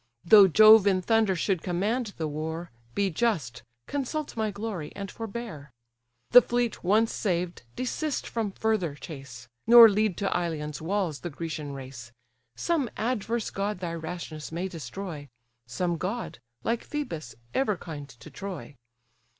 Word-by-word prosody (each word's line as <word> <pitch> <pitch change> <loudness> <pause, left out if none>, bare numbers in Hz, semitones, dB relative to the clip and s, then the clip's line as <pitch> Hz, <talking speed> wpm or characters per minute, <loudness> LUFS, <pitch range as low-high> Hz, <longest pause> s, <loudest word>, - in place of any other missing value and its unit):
Though 200 +2 +9
Jove 215 +3 +8
in 185 -2 +2
thunder 220 -2 +3
should 185 -1 0
command 205 +5 -1
the 160 - -2
war, 160 +3 -4 0.2
Be 200 -2 +1
just, 160 - -1 0.2
consult 290 +2 -3
my 220 -1 0
glory, 200 -6 -5
and 200 -1 -6
forbear. 220 -10 -7 0.6
The 245 - +10
fleet 240 -1 -1
once 215 +5 +3
saved, 180 -3 -1
desist 280 +4 -2
from 225 -3 -2
further 190 -8 0
chase, 135 -7 -10 0.2
Nor 235 -1 +11
lead 210 -2 +1
to 200 -1 -1
Ilion's 155 -4 -3
walls 175 -3 -1
the 175 - -5
Grecian 150 -2 -5
race; 130 -3 -9 0.4
Some 295 - 0
adverse 230 -1 -1
god 200 +1 -2
thy 175 -2 -4
rashness 160 -2 -6
may 175 +3 -2
destroy; 160 -1 -7 0.4
Some 170 +8 -1
god, 205 - -4 0.2
like 230 +1 -1
Phœbus, 165 - -5 0.2
ever 215 -8 +1
kind 150 -5 -8
to 120 -3 -14
Troy. 185 -8 -7
190 Hz, 140 wpm, -27 LUFS, 160-220 Hz, 0.6 s, Nor